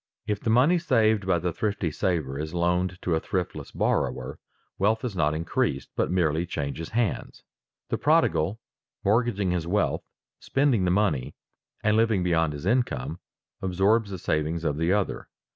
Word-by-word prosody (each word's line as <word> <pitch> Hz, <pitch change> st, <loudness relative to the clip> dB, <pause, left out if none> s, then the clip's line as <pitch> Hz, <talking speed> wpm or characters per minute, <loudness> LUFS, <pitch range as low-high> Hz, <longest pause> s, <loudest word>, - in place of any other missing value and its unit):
If 105 Hz, -1 st, -1 dB
the 115 Hz, -, -2 dB
money 135 Hz, +10 st, +4 dB
saved 110 Hz, -, +2 dB
by 90 Hz, -, +3 dB
the 85 Hz, 0 st, -2 dB
thrifty 100 Hz, -5 st, -1 dB
saver 75 Hz, -5 st, -1 dB
is 80 Hz, +3 st, -4 dB
loaned 90 Hz, +1 st, 0 dB
to 90 Hz, -, 0 dB
a 80 Hz, -, +2 dB
thriftless 90 Hz, +1 st, -3 dB
borrower, -, -, -1 dB, 0.4 s
wealth 110 Hz, +4 st, +2 dB
is 115 Hz, -5 st, -4 dB
not 75 Hz, -3 st, +1 dB
increased, 80 Hz, -4 st, -1 dB
but -, -, 0 dB
merely 85 Hz, -2 st, +1 dB
changes 70 Hz, +1 st, -4 dB
hands. 115 Hz, -2 st, -2 dB, 0.5 s
The -, -, -1 dB
prodigal 85 Hz, +7 st, +2 dB, 0.5 s
mortgaging 105 Hz, -3 st, +2 dB
his 85 Hz, -2 st, -1 dB
wealth, 100 Hz, +3 st, +1 dB, 0.4 s
spending 135 Hz, -8 st, +1 dB
the -, -, +2 dB
money, 90 Hz, -9 st, +1 dB, 0.5 s
and 105 Hz, 0 st, +3 dB
living 110 Hz, -4 st, +3 dB
beyond 80 Hz, -3 st, +1 dB
his 75 Hz, +3 st, -7 dB
income, 85 Hz, -, 0 dB, 0.4 s
absorbs 100 Hz, +4 st, +2 dB
the 95 Hz, -, -5 dB
savings 80 Hz, 0 st, -1 dB
of 75 Hz, -3 st, 0 dB
the 80 Hz, +3 st, +1 dB
other. 100 Hz, -1 st, -1 dB
90 Hz, 160 wpm, -26 LUFS, 80-105 Hz, 0.5 s, money